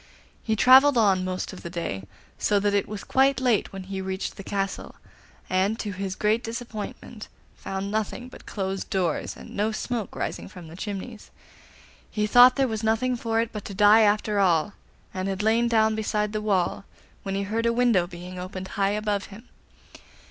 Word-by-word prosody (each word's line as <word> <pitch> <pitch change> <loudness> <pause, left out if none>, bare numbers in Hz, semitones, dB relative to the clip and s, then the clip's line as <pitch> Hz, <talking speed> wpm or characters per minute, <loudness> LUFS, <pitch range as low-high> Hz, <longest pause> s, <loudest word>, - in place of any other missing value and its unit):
He 220 - 0
travelled 260 +4 +7
on 195 -5 +3
most 185 0 -3
of 190 - -10
the 170 - -7
day, 165 - -4 0.3
so 205 - +2
that 205 0 +1
it 200 -1 +1
was 210 0 -6
quite 270 +1 +3
late 245 -5 +1
when 195 -1 -7
he 190 0 -5
reached 190 0 -4
the 195 - -9
castle, 195 0 -3 0.5
and 190 +4 +1
to 210 -3 -4
his 190 0 -4
great 215 +2 +1
disappointment 225 -2 -7 0.3
found 195 +1 -5
nothing 220 +3 -3
but 255 - -14
closed 195 -1 -4
doors 180 -6 -1
and - - -12
no 210 +2 0
smoke 225 -1 -4
rising - - -4
from 180 -3 -11
the 165 - -11
chimneys. 205 +4 -6 0.8
He 210 -1 -1
thought 245 +4 +7
there 270 -1 +2
was 220 -2 -3
nothing 225 +3 +1
for 225 -1 0
it 230 - -3
but 210 -2 -6
to 200 - -7
die 210 +2 +6
after 210 0 +2
all, 180 0 +2 0.4
and 185 0 -3
had 195 +1 -2
lain 225 +2 +3
down 220 -2 +3
beside 210 -1 -1
the 215 - -2
wall, 195 -3 0 0.4
when 195 -1 -4
he 200 - -1
heard 225 +4 -1
a - - +3
window 230 -7 +3
being 180 +1 -9
opened 185 +1 -6
high 200 -1 0
above 210 -2 -1
him. 205 +3 -13
205 Hz, 190 wpm, -25 LUFS, 190-225 Hz, 0.8 s, travelled